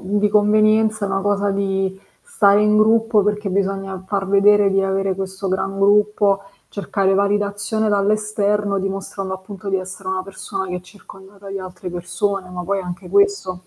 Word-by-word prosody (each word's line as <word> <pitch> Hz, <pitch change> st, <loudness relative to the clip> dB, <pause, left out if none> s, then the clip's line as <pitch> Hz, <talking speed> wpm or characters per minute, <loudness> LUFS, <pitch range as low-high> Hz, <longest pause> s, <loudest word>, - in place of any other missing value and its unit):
di 205 Hz, +2 st, 0 dB
convenienza, 215 Hz, 0 st, +3 dB
è -, -, -4 dB
una 195 Hz, 0 st, -1 dB
cosa 205 Hz, 0 st, +1 dB
di 195 Hz, -1 st, -1 dB, 0.2 s
stare 210 Hz, -, +3 dB
in 210 Hz, 0 st, +3 dB
gruppo, 220 Hz, 0 st, +3 dB
perché 210 Hz, 0 st, -1 dB
bisogna 195 Hz, -1 st, -2 dB
far 195 Hz, -1 st, -2 dB
vedere 205 Hz, +1 st, +5 dB
di 195 Hz, 0 st, +2 dB
avere 195 Hz, 0 st, 0 dB
questo 190 Hz, 0 st, -5 dB
gran 195 Hz, +1 st, -2 dB
gruppo, 205 Hz, 0 st, +3 dB, 0.3 s
cercare 195 Hz, -1 st, -1 dB
validazione 205 Hz, +2 st, 0 dB
dall'esterno, 205 Hz, 0 st, 0 dB
dimostrando 195 Hz, 0 st, -4 dB
appunto 190 Hz, +1 st, -8 dB
di 195 Hz, -, +1 dB
essere 185 Hz, 0 st, -7 dB
una 185 Hz, 0 st, -2 dB
persona 195 Hz, 0 st, -6 dB
che 180 Hz, -, -4 dB
è -, -, -6 dB
circondata 195 Hz, +1 st, -15 dB
di 195 Hz, 0 st, -4 dB
altre 185 Hz, -1 st, -8 dB
persone, 180 Hz, +2 st, -3 dB
ma 180 Hz, 0 st, -5 dB
poi 195 Hz, +2 st, -1 dB
anche 180 Hz, -1 st, -7 dB
questo, 400 Hz, -, +1 dB
195 Hz, 160 wpm, -20 LUFS, 190-205 Hz, 0.3 s, vedere